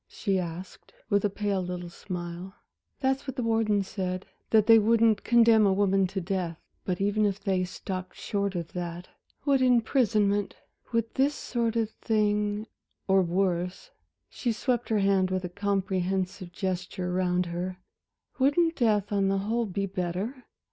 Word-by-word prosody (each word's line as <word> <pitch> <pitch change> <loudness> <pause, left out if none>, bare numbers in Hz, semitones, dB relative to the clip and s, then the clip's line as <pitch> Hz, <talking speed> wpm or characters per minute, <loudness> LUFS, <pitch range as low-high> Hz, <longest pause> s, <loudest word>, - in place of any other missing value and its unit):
she 195 -3 -1
asked, 175 +1 -7 0.2
with 200 -1 +3
a 205 - +2
pale 200 -1 -1
little 180 -1 -5
smile. 175 +1 -7 0.5
"That's 265 +1 0
what 265 - -4
the 250 - -2
warden 225 -3 +2
said 185 -1 -4 0.2
that 215 -2 +5
they 225 0 +8
wouldn't 225 0 +3
condemn 230 -3 +5
a - - +3
woman 195 -1 +2
to 195 +1 -3
death. 180 -2 -2 0.3
But 180 -2 -2
even 205 +2 +1
if 200 -1 +1
they 190 -3 0
stopped 185 +1 -6
short 200 -2 -2
of 170 -2 -4
that, 175 0 -5 0.4
would 275 -2 +3
imprisonment 220 -5 +2 0.4
would 230 -1 0
this 280 +2 +2
sort 235 -4 -2
of 225 -2 0
thing, 210 -1 0 0.4
or 190 0 +5
worse" 180 - -1 0.4
she 240 - -2
swept 240 +1 -1
her 220 - +2
hand 195 -2 +3
with 185 0 -1
a - - -4
comprehensive 190 -2 -1
gesture 185 -1 -3
round 180 0 +1
her 175 +2 -4 0.6
"wouldn't 325 +5 +3
death, 210 -5 +2
on 200 -1 +2
the 195 0 +1
whole, 225 +4 -1
be 195 +1 -2
better?" 190 +7 -4
200 Hz, 155 wpm, -28 LUFS, 185-225 Hz, 0.6 s, they